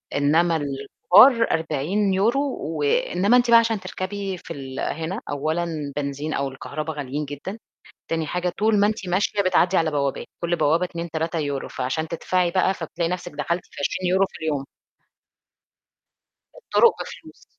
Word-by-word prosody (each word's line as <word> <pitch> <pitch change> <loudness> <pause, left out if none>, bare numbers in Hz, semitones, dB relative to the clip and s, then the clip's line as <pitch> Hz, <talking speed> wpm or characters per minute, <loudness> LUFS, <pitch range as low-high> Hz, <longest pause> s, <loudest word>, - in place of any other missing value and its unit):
إنّما 160 +4 +3
الكبار 160 - +4
40 160 +6 0
يورو 225 +8 +2 0.2
و 155 0 -3
إنّما 190 +10 +3
أنتِ 245 -1 +2
بقى 230 - +9
عشان 225 -2 0
تركبي 190 +1 -4
في - - -5
ال 135 -1 -7
هنا 165 +8 -3
أولًا 155 +4 -1 0.3
بنزين 145 +1 -3
أو 140 - -1
الكهربا 150 +4 -5
غاليين 145 0 -4
جدًا، 145 +9 -7 0.5
تاني 160 -2 -1
حاجة 180 0 -1
طول 215 0 +3
ما 205 - +5
أنتِ 215 -3 -3
ماشية 200 +3 +1
بتعدّي 185 0 +3
على 160 -2 +2
بوابات، 140 -2 -1 0.2
كل 170 0 +1
بوابة 165 +3 +2
2،3€ 165 -4 -3
فعشان 155 +6 -2
تدفعي 175 +2 0
بقى 185 +1 +2
فبتلاقي 170 0 -3
نَفْسِك 180 -1 -4
دخلتِ 170 +4 -2
في - - -21
20€ 185 +5 +1
في - - -12
اليوم. 145 -4 -1 1.9
الطُرق 475 -1 +3
بفلوس. - - -12
170 Hz, 145 wpm, -23 LUFS, 150-190 Hz, 1.9 s, بقى